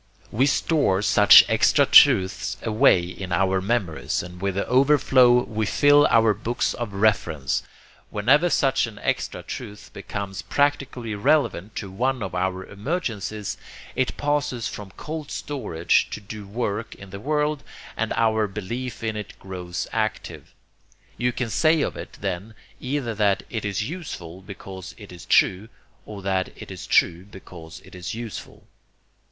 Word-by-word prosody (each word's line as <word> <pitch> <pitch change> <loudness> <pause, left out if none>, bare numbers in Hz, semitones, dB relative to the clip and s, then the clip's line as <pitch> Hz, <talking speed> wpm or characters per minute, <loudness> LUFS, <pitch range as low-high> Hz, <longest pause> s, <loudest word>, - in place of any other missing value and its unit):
We 130 +6 +2
store 140 - +1
such 105 -1 +8
extra 110 +6 +4
truths 95 -11 +5
away 110 -5 +4
in 90 +1 -7
our 95 +1 +1
memories, 95 -8 -1
and 90 0 -10
with 100 -1 -1
the 100 - -1
overflow 130 -2 +4
we 110 -1 -3
fill 145 +3 +5
our 115 -1 +4
books 115 +4 -2
of 120 -3 -5
reference. 90 -9 0 0.5
Whenever 140 - +3
such 135 -6 +2
an 110 -2 -11
extra - - -2
truth 105 0 -8
becomes 100 -2 -6
practically 135 -5 -1
relevant 110 - +1
to 100 -3 -5
one 125 +4 -1
of 95 - -5
our 95 +1 -2
emergencies, 110 - -4 0.4
it 130 - -1
passes 145 -5 -1
from 105 -2 -8
cold 155 -1 -6
storage 105 - 0
to - - -6
do 105 0 -9
work 110 0 -3
in 95 -1 -13
the 100 - -7
world, 150 +3 -1 0.3
and - - -2
our 110 -2 +2
belief 110 +5 -6
in 110 -1 -2
it 105 -1 -7
grows 90 -2 -6
active. 110 -2 -4 0.6
You 125 +1 0
can 120 -2 -3
say 155 +4 +3
of - - -3
it - - -9
then 100 +5 -4 0.2
either 130 -3 -2
that 105 -2 +1
'it 110 -3 -3
is 105 +1 -2
useful 95 - -7
because 95 -1 -10
it - - -12
is 90 - -12
true' 95 +5 +3 0.4
or 100 -2 -8
that 95 -1 0
'it - - -10
is - - -8
true 85 +1 +2
because 90 -5 -12
it - - -16
is 90 +3 -6
useful.' 115 -2 -8
105 Hz, 150 wpm, -24 LUFS, 95-125 Hz, 0.6 s, such